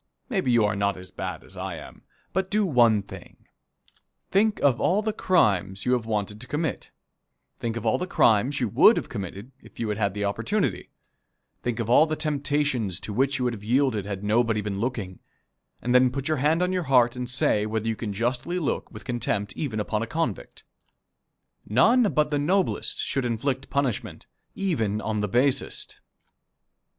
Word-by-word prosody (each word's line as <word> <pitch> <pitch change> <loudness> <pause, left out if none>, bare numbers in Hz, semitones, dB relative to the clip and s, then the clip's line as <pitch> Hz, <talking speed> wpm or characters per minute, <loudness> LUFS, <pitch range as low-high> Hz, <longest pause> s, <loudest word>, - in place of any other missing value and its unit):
Maybe 190 - 0
you 115 -3 +4
are 105 - 0
not 100 -1 0
as 90 0 -11
bad 90 -4 -5
as 95 - -10
I 95 -1 -4
am, 75 - -11 0.3
but 190 0 -1
do 210 0 +2
one 120 - +4
thing: - - -13 0.9
think 210 +2 +2
of 130 -4 +3
all 200 +4 +2
the 215 0 -1
crimes 100 - +1
you 125 - +2
have 120 -3 -1
wanted 105 -1 -2
to 130 - -10
commit; 150 0 -3 0.7
think 115 -1 -3
of 115 - -6
all 110 - +2
the 180 - -3
crimes 120 - +3
you 120 - +1
would 150 - +6
have - - -3
committed 100 +2 -6
if - - -17
you 115 - -2
had 105 +1 -2
had 100 -2 0
the 105 0 -1
opportunity; 115 - -1 0.7
think 120 -1 -2
of 115 - -2
all 135 +7 +5
the 155 - -1
temptations 145 - -1
to 105 +3 -5
which 135 +5 +1
you 125 - -1
would 120 - 0
have 105 -3 -9
yielded 120 -3 +1
had 100 -1 -5
nobody 110 +1 +2
been 100 -1 -3
looking; 110 -6 -3 0.6
and 125 - 0
then 125 0 +6
put 135 +2 -4
your 155 -1 +1
hand 155 +6 +2
on 180 +1 0
your 180 -3 -1
heart 125 -2 +4
and 125 -1 -4
say 105 -4 +2
whether 110 0 -2
you 115 - 0
can 105 -1 -4
justly 125 - -1
look 165 -6 -2
with - - -11
contempt 105 -5 -2
even 120 -8 -3
upon 105 0 -1
a 115 - -3
convict. 160 - -3 1.1
None 220 - +4
but 150 -1 +1
the 145 - +1
noblest 185 +6 0
should 135 - -1
inflict 125 +3 -2
punishment, 140 -5 -2 0.3
even 115 - -1
on 110 -1 -2
the 105 - 0
basest. 125 +6 0
120 Hz, 190 wpm, -25 LUFS, 105-145 Hz, 1.1 s, would